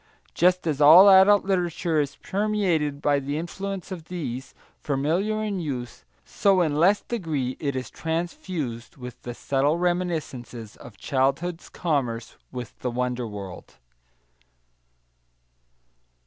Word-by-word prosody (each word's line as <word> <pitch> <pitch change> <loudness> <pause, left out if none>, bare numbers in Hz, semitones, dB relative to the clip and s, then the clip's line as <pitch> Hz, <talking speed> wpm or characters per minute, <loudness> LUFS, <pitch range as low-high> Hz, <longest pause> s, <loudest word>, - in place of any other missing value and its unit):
Just 180 +1 +3
as 150 -3 -1
all 165 +7 +9
adult 195 +2 +6
literature 175 -4 0
is 140 -1 -4
permeated 190 -8 -1
by 145 -1 +3
the 140 +2 -3
influence 195 +3 -5
of 170 -4 -6
these, 135 -7 -6 0.2
familiar 170 +10 0
in 205 -3 -2
youth, 130 -7 -5 0.2
so 195 -2 +2
in 155 -4 +1
less 185 +7 +4
degree 155 - -3
is 140 -3 -2
it 130 -1 -5
transfused 160 -7 -4
with 125 -2 -9
the 120 -1 -7
subtle 140 +5 +1
reminiscences 160 -11 -3
of 115 -5 -13
childhood's 145 - -1
commerce 125 -9 -2 0.2
with 125 -3 -8
the 125 - -2
wonder 125 0 -2
world. 100 -4 -9
155 Hz, 120 wpm, -25 LUFS, 130-180 Hz, 0.2 s, all